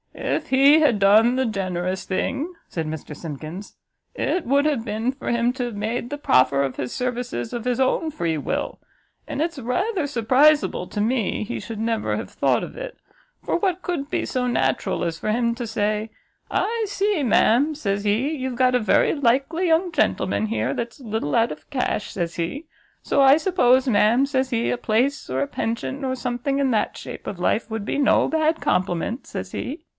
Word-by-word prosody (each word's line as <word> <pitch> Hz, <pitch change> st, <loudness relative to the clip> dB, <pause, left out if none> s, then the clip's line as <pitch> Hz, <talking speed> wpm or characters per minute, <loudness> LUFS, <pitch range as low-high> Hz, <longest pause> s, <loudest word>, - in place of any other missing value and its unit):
"If 305 Hz, -, -2 dB
he 275 Hz, +4 st, +6 dB
had 285 Hz, -8 st, +3 dB
done 215 Hz, +5 st, +5 dB
the 260 Hz, 0 st, +1 dB
generous 185 Hz, -3 st, -2 dB
thing," 270 Hz, -, -2 dB
said 165 Hz, -2 st, -4 dB
Mr 155 Hz, -1 st, -6 dB
Simkins, 160 Hz, +5 st, -8 dB, 0.4 s
"it 360 Hz, -, -1 dB
would 280 Hz, +3 st, +3 dB
have 285 Hz, -7 st, +1 dB
been 225 Hz, +2 st, -1 dB
for 270 Hz, -, -6 dB
him 235 Hz, +1 st, +1 dB
to 250 Hz, -1 st, -3 dB
have 240 Hz, -3 st, -5 dB
made 225 Hz, +4 st, -3 dB
the 290 Hz, -, -4 dB
proffer 140 Hz, -, +3 dB
of 135 Hz, -2 st, -3 dB
his 125 Hz, -, -3 dB
services 245 Hz, -, -3 dB
of 240 Hz, -1 st, -4 dB
his 250 Hz, 0 st, 0 dB
own 265 Hz, +5 st, +1 dB
free 170 Hz, -, -2 dB
will; 145 Hz, -, -3 dB, 0.5 s
and 280 Hz, -, -3 dB
it's 330 Hz, -2 st, -2 dB
rather 290 Hz, -, -1 dB
surpriseable 270 Hz, -3 st, +3 dB
to 205 Hz, -, -2 dB
me 225 Hz, -1 st, 0 dB
he 240 Hz, +3 st, -4 dB
should 225 Hz, -2 st, -7 dB
never 225 Hz, 0 st, -1 dB
have -, -, -6 dB
thought -, -, +1 dB
of -, -, -8 dB
it; -, -, -7 dB, 0.5 s
for -, -, 0 dB
what 370 Hz, -3 st, -1 dB
could 305 Hz, -5 st, -3 dB
be -, -, -1 dB
so 250 Hz, -1 st, -1 dB
natural 135 Hz, -, 0 dB
as 165 Hz, -1 st, -2 dB
for 215 Hz, -, -1 dB
him 235 Hz, +1 st, +1 dB
to 240 Hz, -1 st, -5 dB
say, 215 Hz, 0 st, -1 dB, 0.4 s
I 455 Hz, 0 st, 0 dB
see, 400 Hz, -3 st, 0 dB
ma'am, 260 Hz, +5 st, +3 dB
says 200 Hz, -8 st, -2 dB
he, 215 Hz, +7 st, +1 dB
you've 260 Hz, -5 st, -4 dB
got 255 Hz, 0 st, +3 dB
a -, -, +4 dB
very 215 Hz, -4 st, +3 dB
likely 285 Hz, +6 st, +1 dB
young 335 Hz, +2 st, +2 dB
gentleman 280 Hz, -8 st, +1 dB
here, 225 Hz, -, -1 dB
that's 235 Hz, +2 st, -5 dB
a -, -, -13 dB
little 220 Hz, -10 st, -2 dB
out 230 Hz, +1 st, +3 dB
of -, -, -10 dB
cash, 255 Hz, -6 st, -2 dB
says 170 Hz, -2 st, -3 dB
he, 180 Hz, -, -3 dB, 0.4 s
so -, -, +2 dB
I 275 Hz, +1 st, +7 dB
suppose, 265 Hz, -8 st, +3 dB
ma'am, 235 Hz, +3 st, +4 dB
says 265 Hz, -2 st, 0 dB
he, 235 Hz, -2 st, 0 dB
a -, -, -1 dB
place, 245 Hz, +5 st, 0 dB
or 130 Hz, +1 st, -1 dB
a 140 Hz, -, 0 dB
pension, 235 Hz, +5 st, -3 dB
or 260 Hz, -1 st, -1 dB
something 250 Hz, +2 st, -2 dB
in 270 Hz, -2 st, +2 dB
that 215 Hz, -2 st, 0 dB
shape -, -, -9 dB
of 185 Hz, -, -5 dB
life, 215 Hz, +5 st, 0 dB
would 220 Hz, -2 st, -4 dB
be -, -, -2 dB
no 285 Hz, -, +3 dB
bad 320 Hz, 0 st, +1 dB
compliment, 185 Hz, +6 st, -1 dB
says -, -, -6 dB
he." 285 Hz, +7 st, -5 dB
245 Hz, 200 wpm, -23 LUFS, 210-280 Hz, 0.5 s, I